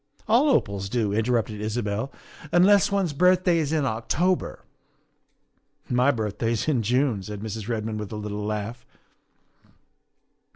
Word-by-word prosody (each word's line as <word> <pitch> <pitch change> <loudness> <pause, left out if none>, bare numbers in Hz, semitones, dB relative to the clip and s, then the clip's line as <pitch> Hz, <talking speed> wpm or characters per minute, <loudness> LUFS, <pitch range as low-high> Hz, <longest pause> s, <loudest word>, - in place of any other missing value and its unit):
"All 245 +7 +4
opals 100 - 0
do," 110 -3 0
interrupted 110 -1 0
Isabel, 110 +3 -2 0.2
" 150 - -16
unless 195 +4 +5
one's 195 -6 0
birthday 180 +2 +3
is 150 -2 -1
in 155 -3 +1
October." 155 +11 -1 0.6
" - - -41
My 135 - +4
birthday 115 -2 -1
is 115 - -2
in 140 -7 +2
June," 125 -1 +1
said 105 +1 -7
Mrs. 110 -1 -5
Redmond 110 -1 -2
with 105 -2 -6
a - - -5
little 105 0 -5
laugh. 105 +3 -4
115 Hz, 140 wpm, -25 LUFS, 105-155 Hz, 0.6 s, unless